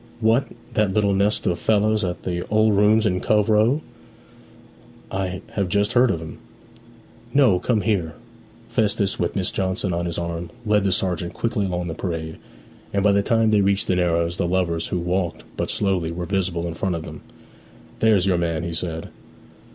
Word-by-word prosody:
'What, 115 +3 +2 0.3
that 105 -3 +1
little 100 -1 +2
nest 100 +2 +1
of 85 -1 0
fellows 110 0 +2
at 90 -1 -3
the 90 -1 -2
"Old 110 0 +3
Rooms" 105 +2 +4
in 90 -3 +1
Cove 105 0 +2
Row? 110 +8 +3 1.3
I 95 -1 -3
have 100 -3 -1
just 100 +2 +1
heard 125 0 +5
of 85 - 0
'em.' 80 -1 -9 1.0
'No 125 -10 +5
come 115 0 +1
here.' 90 -8 -1 0.5
Festus, 100 -2 0
with 85 - -1
Miss 95 -2 0
Johnson 95 0 -1
on 85 +1 -1
his 85 - -4
arm, 85 0 -4 0.2
led 105 -2 +2
the 95 - +2
sergeant 90 -2 0
quickly 115 -4 -1
along 90 -1 -2
the 80 - -3
parade, 80 -3 -4 0.5
and 100 -1 0
by 105 - +5
the 100 0 +3
time 115 +1 +2
they 105 -1 +4
reached 100 0 +2
the 90 - +1
Narrows 85 -1 +1
the 85 - 0
lovers, 85 -2 0
who - - -2
walked 90 0 -2
but - - -2
slowly, 95 -5 0
were 85 +1 -4
visible 90 -3 -1
in 85 - -3
front 90 +2 -2
of 80 - -5
them. 80 -2 -9 0.8
'There's 105 -5 +4
your 90 -3 +2
man,' 85 -1 -1
he 85 -1 -4
said. 80 -1 -4
95 Hz, 185 wpm, -22 LUFS, 85-105 Hz, 1.3 s, heard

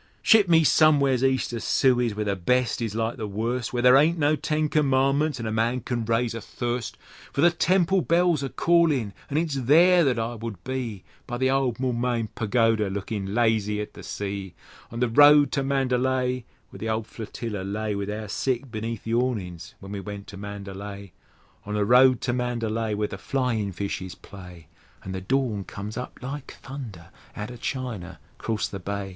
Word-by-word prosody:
Ship 215 -5 +5
me 165 -1 +6
somewheres 140 -4 +4
east 130 -2 +1
of 115 - -3
Suez, 120 -2 +2
where 105 0 -2
the 100 -1 0
best 125 +6 +1
is 110 -2 -3
like 115 +2 -1
the 110 -3 -4
worst, 115 +4 -2
Where 120 -1 -1
there 125 +1 +7
aren't 155 +5 +4
no 150 0 +3
Ten 155 0 0
Commandments 140 0 +2
an' 115 - -4
a 110 - -2
man 115 +3 0
can 120 0 -2
raise 115 +1 0
a 115 - -5
thirst; 120 +2 -4 0.3
For 140 - -1
the 175 +2 +6
temple 185 +2 +2
bells 170 -3 +2
are 135 - -2
callin', 155 -13 +2 0.2
an' 145 - -1
it's 160 -2 0
there 165 +7 +5
that 130 -5 +2
I 115 +1 -2
would 115 -5 -7
be 120 -7 -4 0.2
By 120 - -3
the 130 +1 +2
old 135 -3 +1
Moulmein 120 -3 -1
Pagoda, 115 -2 +1
looking 100 0 -4
lazy 110 -3 +1
at 105 - -5
the - - -11
sea; 100 -3 -5 0.3
On 115 +1 -6
the 125 - +3
road 145 +3 +6
to 140 - 0
Mandalay, 130 -2 0 0.3
Where - - -11
the 110 - -3
old 110 0 -1
Flotilla 110 -2 -6
lay, 105 +2 -3
With 100 0 -3
our 105 +1 -4
sick 125 +4 -2
beneath 115 0 -4
the 115 - -3
awnings 105 -9 -2
when 100 0 -10
we 100 - -4
went 100 0 -7
to 100 - -9
Mandalay! 100 -1 -7 0.5
On 105 +1 -4
the 105 -1 +1
road 125 +2 +5
to 120 - -1
Mandalay, 115 -3 -1
Where 105 0 -1
the 100 - -8
flyin' 115 -5 -1
fishes 95 -1 -4
play, 90 -4 -12 0.4
An' 95 - -6
the 95 0 -4
dawn 115 -1 0
comes 105 +3 -7
up 125 - -6
like 135 +2 -6
thunder 115 -12 -8 0.2
outer 105 +4 -6
China 110 - -5 0.2
'crost 110 -1 -2
the 100 - -5
Bay! 100 +1 -4
115 Hz, 190 wpm, -25 LUFS, 105-130 Hz, 0.5 s, there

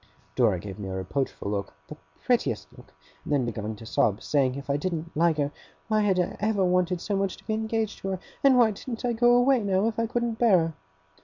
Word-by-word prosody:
Dora 115 -7 +3
gave 100 +2 -8
me 95 -2 -5
a 95 - -4
reproachful 100 +2 -3
look 100 -6 -3
the - - -8 0.3
prettiest - - 0
look! - - -16 0.3
and - - -7
then 140 -4 +2
began 110 -2 -4
to 115 - -12
sob, 105 -1 +1
saying, 135 -3 +1
if 140 0 -7
I 140 - +1
didn't 165 +1 -3
like 165 0 +3
her, 145 -1 0 0.4
why 215 -1 +3
had 195 -3 +2
I 175 - -1
ever 210 -2 +1
wanted 180 0 +1
so 205 +3 -2
much 195 -1 -1
to - - -19
be 220 - -1
engaged 220 -1 -2
to - - -6
her? 190 -1 -2 0.2
And 270 -2 +6
why 235 -3 +5
didn't 230 +4 -6
I 240 - +1
go 240 +1 +4
away, 250 0 +4
now, 195 0 +1
if 225 0 -2
I 230 - +1
couldn't 235 -1 -2
bear 225 -6 +5
her? 165 -1 0
180 Hz, 235 wpm, -26 LUFS, 135-220 Hz, 0.4 s, And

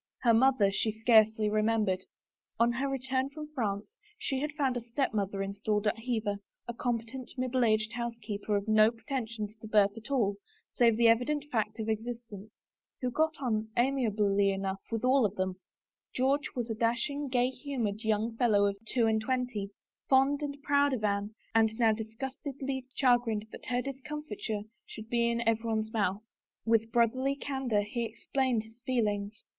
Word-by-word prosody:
Her 235 -2 +5
mother 230 -4 +4
she 205 +3 0
scarcely 220 -1 +4
remembered. 215 -3 +1 0.5
On 235 +1 +4
her 265 +3 -1
return 265 0 -1
from 300 +1 -8
France 205 -6 -1 0.3
she 295 -12 -2
had 300 +2 -2
found 275 -4 0
a 245 - -2
stepmother 215 -5 -1
in 195 0 -4
stalled 210 +1 -1
at 210 +1 +1
Hever, 225 -4 -1 0.3
a 235 - -3
competent, 240 +1 -3
middle 255 0 +1
aged 215 0 +2
housekeeper 230 -4 -3
of 200 +1 -4
no 215 0 +6
pretensions 225 -3 -4
to 220 - -10
birth 210 -2 +4
at 225 +3 -10
all, 215 -8 +1 0.4
save 230 -2 +4
the 235 0 +5
evident 250 +6 +2
fact 215 -2 -1
of 220 - -3
existence, 225 -2 -4 0.5
who 250 -2 -1
got 315 +4 +1
on, 220 -5 -1
amiably 210 -6 +2
enough, 195 0 -2
with 225 0 -2
them - - +3
all. 200 -8 +2 0.6
George^was 265 -2 0
a - - +1
dashing, 240 +6 0
gay 250 0 +2
humored 240 -7 -3
young 220 +1 0
fellow 210 -5 +4
of 200 0 0
two 240 -1 +2
and 220 -1 +2
twenty, 245 -4 -2 0.4
fond 270 +2 +4
and 285 -1 -5
proud 285 -1 +3
of 230 -4 -2
Anne 205 +1 -1 0.2
and 220 -1 +3
now 230 -2 +4
dis 220 0 -6
gustedly 270 0 -4
chagrined 240 -5 +2
that - - -10
her 245 0 0
discomfiture 275 -6 -5 0.2
should 220 0 -9
be 235 -1 +2
in 235 -1 -1
everyone's 220 -1 0
mouth. 205 -1 0 0.4
With 225 0 +2
brotherly 255 +4 +2
candor 265 -7 -1
he 235 +3 -3
explained 235 +1 -1
his 225 +1 -18
feelings. 210 -4 -1
230 Hz, 165 wpm, -30 LUFS, 215-260 Hz, 0.6 s, no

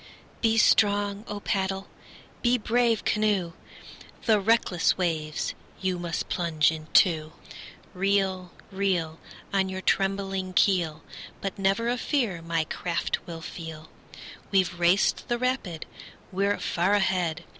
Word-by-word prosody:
Be 225 -1 +3
strong, 205 -1 +3
O 205 - -5
paddle! 195 -2 -1 0.5
be 245 0 +3
brave, 235 0 +1
canoe! 205 -5 +1 0.7
The 220 -3 +4
reckless 195 -5 +2
waves 160 -4 -1 0.3
you 185 -2 -1
must 170 -2 -3
plunge 165 -3 +2
into. 155 0 +2 0.6
Reel, 190 -1 0 0.2
reel. 180 -5 -1 0.3
On 190 -1 +2
your 190 0 -4
trembling 195 -1 0
keel, 170 -5 +2 0.4
But 195 0 -5
never 195 +4 +1
a 245 +1 0
fear 230 - 0
my 165 -1 0
craft 170 +2 -3
will 165 -1 -7
feel. 160 -2 -8 0.6
We've 185 -3 +1
raced 175 +3 +3
the 240 - 0
rapid, 240 -10 -2 0.5
we're 200 +2 +1
far 185 +4 +1
ahead! 180 -5 0
190 Hz, 120 wpm, -27 LUFS, 170-205 Hz, 0.7 s, The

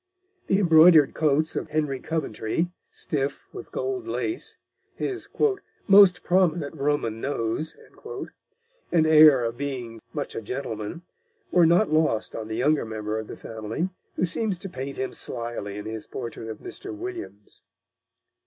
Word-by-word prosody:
The 190 - +3
embroidered 165 -5 +7
coats 155 +1 +1
of - - -3
Henry 150 -3 -1
Coventry, 160 +1 -2 0.2
stiff 140 -2 -3
with - - -9
gold 385 -3 -3
lace, 350 0 -3 0.4
his 380 -2 -3 0.6
"most 195 -3 +7
prominent 175 -5 +2
Roman 140 -7 -1
nose" 140 +3 -2 1.1
and 165 -2 +4
air 155 -5 +7
of 115 0 -2
being 125 -5 -5
much - - -4
a - - -3
gentleman, 110 +3 -5 0.5
were 175 -2 +6
not 170 +1 +3
lost 155 -9 +1
on 110 -1 -5
the 110 0 -4
younger 145 +5 +2
member 110 -1 -3
of 110 - -7
the - - -8
family, 110 - -4 0.3
who - - +1
seems 195 +3 -1
to 195 +2 -8
paint 135 -2 -6
him 130 - -3
slyly 115 -4 -5
in 105 - -6
his 110 0 -6
portrait 115 -2 -6
of 110 - -6
Mr. 395 - -7
Williams. 345 - -8
145 Hz, 145 wpm, -25 LUFS, 115-175 Hz, 1.1 s, embroidered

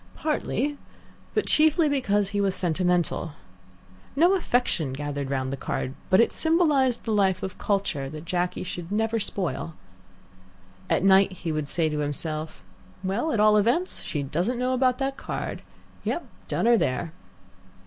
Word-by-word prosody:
Partly, 295 -2 -1 0.6
but - - +2
chiefly 315 +1 +4
because 210 -9 +1
he 205 0 -1
was 195 -2 +1
sentimental. 175 -2 0 0.8
No 345 +6 +5
affection 245 - 0
gathered 145 0 -4
round 130 -1 -1
the - - -3
card, 130 0 -3 0.2
but 185 - +5
it 230 - +4
symbolized 300 -7 +2
the 225 - -2
life 190 -3 +2
of 190 -1 -5
culture, 195 -9 -1
that 155 +2 -8
Jacky 180 +1 -1
should 175 0 -6
never 225 +2 +1
spoil. 175 -6 -2 1.1
At - - +2
night 195 0 +5
he 180 -3 -4
would 155 -2 -2
say 165 -2 +2
to 150 -1 -2
himself, 155 +2 -3 0.4
"Well, 205 +12 -1
at 225 - 0
all 210 0 +6
events, 240 - +1
she 145 -3 -3
doesn't 175 - -1
know 250 +1 0
about 255 -1 +2
that 270 0 -2
card. - - -5 0.4
Yah! - - -1 0.3
done - - -1
her 235 0 +6
there!" 155 0 -1
195 Hz, 155 wpm, -26 LUFS, 160-250 Hz, 1.1 s, all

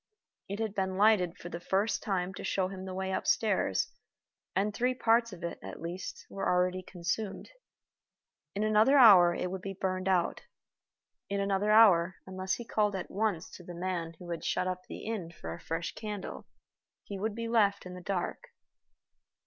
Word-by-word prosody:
It 200 - -3
had 220 -2 -2
been 190 -2 -1
lighted 200 -4 +4
for 175 - -8
the 170 - -5
first 195 +4 0
time 190 -3 -1
to - - -8
show 185 -1 0
him 190 -1 -7
the 190 - -5
way 190 0 -2
upstairs, 190 - +1 0.6
and 200 +2 +1
three 250 +4 +1
parts 230 -1 +3
of 180 -3 -10
it, 170 - -4
at - - -8
least, 175 +3 -6
were 195 - -2
already 180 +1 +2
consumed. 190 - -4 1.0
In 205 - 0
another 215 +6 +5
hour 185 -9 +8
it 180 - -2
would 190 -1 -4
be 195 0 -6
burned 185 0 -1
out. 180 -3 +1 0.9
In 200 0 -1
another 200 +1 +1
hour, 190 -5 +6
unless 190 0 -2
he 240 - -8
called 210 -2 +1
at 185 - -5
once 205 -5 -1
to 180 - -11
the 175 0 -9
man 170 -2 -3
who 175 0 -8
had 170 - -4
shut - - 0
up 185 0 -2
the - - -7
inn 210 -7 -3
for 80 - -7
a 85 - -9
fresh 165 +1 -3
candle, 210 -3 -6 0.6
he 200 -1 -6
would 215 +1 -2
be 230 0 -3
left 210 -5 +2
in 180 - -7
the 180 - -8
dark. 190 - -3
190 Hz, 185 wpm, -31 LUFS, 180-210 Hz, 1.0 s, hour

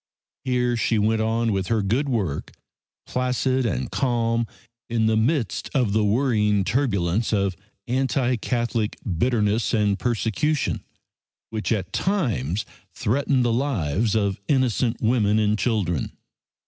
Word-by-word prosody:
Here 125 -2 +1
she 115 -1 +1
went 110 +1 +2
on 115 +1 +1
with 95 -2 -1
her 115 -3 +1
good 125 +9 0
work, 100 - -2 0.5
placid 125 0 0
and 65 - -2
calm 115 +2 0 0.4
in 115 -1 +1
the 110 0 +3
midst 115 +1 0
of 120 -7 +2
the 110 0 +3
worrying 105 -3 +2
turbulence 110 -4 0
of 100 -3 +1 0.3
anti 130 0 +1
Catholic 120 -1 -1
bitterness 105 +3 +1
and 105 -2 +1
persecution, 120 +5 0 0.7
which 110 0 -3
at 100 -5 -1
times 110 - 0 0.3
threatened 130 +2 +1
the 120 - +2
lives 110 - 0
of 100 -3 0
innocent 130 -3 +1
women 110 -2 +3
and 105 0 +2
children. 95 - 0
115 Hz, 125 wpm, -24 LUFS, 105-125 Hz, 0.7 s, the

